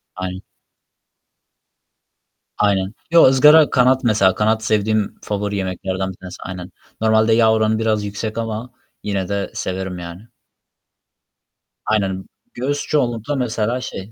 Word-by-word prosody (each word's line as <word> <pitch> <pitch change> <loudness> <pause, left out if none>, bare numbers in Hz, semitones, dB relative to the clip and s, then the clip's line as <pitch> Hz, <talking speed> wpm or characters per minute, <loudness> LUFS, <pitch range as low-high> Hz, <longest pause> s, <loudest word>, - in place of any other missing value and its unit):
Aynen. 95 0 -5 2.2
Aynen. 100 -1 +1 0.2
Yo, 170 - +7
ızgara 150 +4 +6
kanat, 130 +1 +3
mesela. 100 -5 +3
Kanat 110 +1 +1
sevdiğim 110 -1 0
favori 105 0 -3
yemeklerden 95 0 -3
bir 90 - -13
tanesi. 90 -1 -10
Aynen. 90 -1 -7 0.3
Normalde 110 0 +3
yağ 110 -1 +4
oranı 110 0 +1
biraz 110 -2 0
yüksek 110 +2 -5
ama 115 +2 -4 0.3
yine 100 -2 -2
de 100 0 -2
severim, 95 -1 -4
yani. 85 +6 -9 1.6
Aynen. 95 -3 -1 0.3
Göğüs 145 +4 -2
çoğunlukla, 125 -1 0
mesela, 120 -1 -1
şey, 100 -3 -7
110 Hz, 120 wpm, -19 LUFS, 95-115 Hz, 2.2 s, Yo